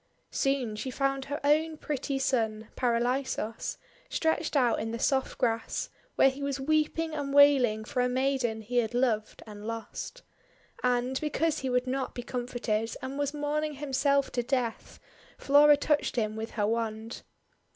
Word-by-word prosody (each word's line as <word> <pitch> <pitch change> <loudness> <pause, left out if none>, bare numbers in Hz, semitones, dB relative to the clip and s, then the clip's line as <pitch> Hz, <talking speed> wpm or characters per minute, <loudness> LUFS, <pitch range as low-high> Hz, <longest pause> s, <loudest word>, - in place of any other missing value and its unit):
Soon 270 -5 0
she 235 +5 -4
found 275 +1 -1
her 285 +2 -4
own 310 +2 +2
pretty 280 -2 -2
son, 225 -5 0
Paralisos, 240 -2 -1 0.3
stretched 320 -1 0
out 245 -4 +3
in 225 - -3
the 230 - -3
soft 265 +2 0
grass, 230 -3 -1 0.3
where 270 - +5
he 270 +2 -9
was 280 -1 -2
weeping 310 +3 0
and 285 -2 -3
wailing 255 -7 +5
for 250 - -1
a 250 - +2
maiden 255 -3 0
he 240 +3 -3
had 240 0 +1
loved 230 -4 0
and 210 -1 -9
lost. 230 - -6 0.6
And, 250 +1 +1
because 310 +1 0
he 265 - -2
would 250 0 +1
not 260 +1 -2
be 245 - -5
com 245 0 -4
forted, 225 -2 -2
and 270 +2 -4
was 285 -1 0
mourning 300 +1 -1
himself 280 0 +1
to 245 - 0
death, 245 -2 -2 0.4
Flora 290 +1 +6
touched 295 0 +1
him 215 -3 0
with 220 +1 -4
her 205 - +2
wand. 225 +1 -2
260 Hz, 160 wpm, -29 LUFS, 230-285 Hz, 0.6 s, Flora